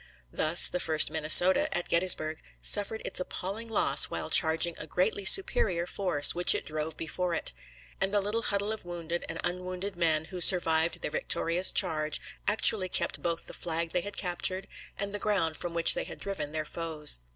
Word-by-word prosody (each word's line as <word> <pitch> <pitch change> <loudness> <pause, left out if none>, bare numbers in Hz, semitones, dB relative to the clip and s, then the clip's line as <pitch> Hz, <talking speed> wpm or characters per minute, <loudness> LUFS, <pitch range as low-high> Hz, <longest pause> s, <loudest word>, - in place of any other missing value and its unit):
Thus, 160 +3 +1
the 180 - -4
1st 160 -2 +3
Minnesota, 160 +5 +5
at 175 - -5
Gettysburg, 170 -3 0 0.2
suffered 205 +2 +1
its - - +1
appalling 195 +5 -7
loss 225 - +3
while - - -7
charging 165 0 +3
a 155 - -8
greatly 190 +5 -3
superior 375 - +5
force, 180 -6 +2
which 175 +1 +7
it - - -5
drove 155 0 -5
before 170 +2 -4
it; - - -3 0.5
and 195 0 +1
the 205 - +1
little 210 +3 -4
huddle 205 -1 -3
of 220 - -7
wounded 170 -1 -6
and 165 - -7
unwounded 180 +2 -6
men 160 -3 -1
who 180 - -6
survived 165 -1 +4
their - - -5
victorious 170 +5 -1
charge 155 -2 -1 0.3
actually 205 -2 +2
kept - - -3
both 170 -1 -4
the - - -10
flag 165 -1 -4
they 180 - -2
had 205 +2 -9
captured 185 +1 -2 0.3
and 200 0 -5
the 205 - -4
ground 195 -7 -2
from 170 +2 -8
which 170 - +6
they - - -5
had - - -11
driven 155 -7 -6
their 155 0 -5
foes. 155 - 0
175 Hz, 185 wpm, -27 LUFS, 160-195 Hz, 0.5 s, which